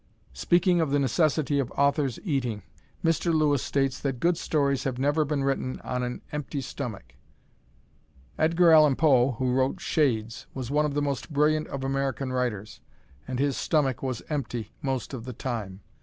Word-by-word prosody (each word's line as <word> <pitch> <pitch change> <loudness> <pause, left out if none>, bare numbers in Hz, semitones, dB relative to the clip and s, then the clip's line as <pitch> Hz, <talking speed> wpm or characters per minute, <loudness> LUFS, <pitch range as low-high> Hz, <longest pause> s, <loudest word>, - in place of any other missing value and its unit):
Speaking 175 - +2
of 160 - 0
the 145 - +2
necessity 145 0 +1
of 130 -3 -1
authors 140 -2 +1
eating, 125 - -2 0.4
Mr. 165 +1 +2
Lewis 150 -4 +2
states 135 0 0
that 135 -3 -3
good 175 +4 +2
stories 140 -5 0
have 130 -2 -2
never 145 +4 +2
been 145 -1 -1
written 135 -1 -1
on 125 0 -3
an 125 0 -4
empty 150 -1 -4
stomach. 120 - -6 1.2
Edgar 165 +2 +4
Allan 155 -3 +6
Poe 135 -4 +4
who 125 +2 -1
wrote 130 +1 +1
"Shades" 115 -7 0
was 130 -1 -4
one 150 +1 +2
of 145 - -5
the 145 - +1
most 140 +1 -3
brilliant 150 +1 +2
of 135 -1 -5
American 135 -1 -1
writers, 110 -5 -3 0.5
and 130 -1 -3
his 140 +1 +1
stomach 140 -7 0
was 130 -4 -3
empty 125 -7 -4
most 135 -1 -3
of 120 -4 -5
the 125 +1 -6
time. 105 -6 -5
135 Hz, 170 wpm, -27 LUFS, 125-150 Hz, 1.2 s, Allan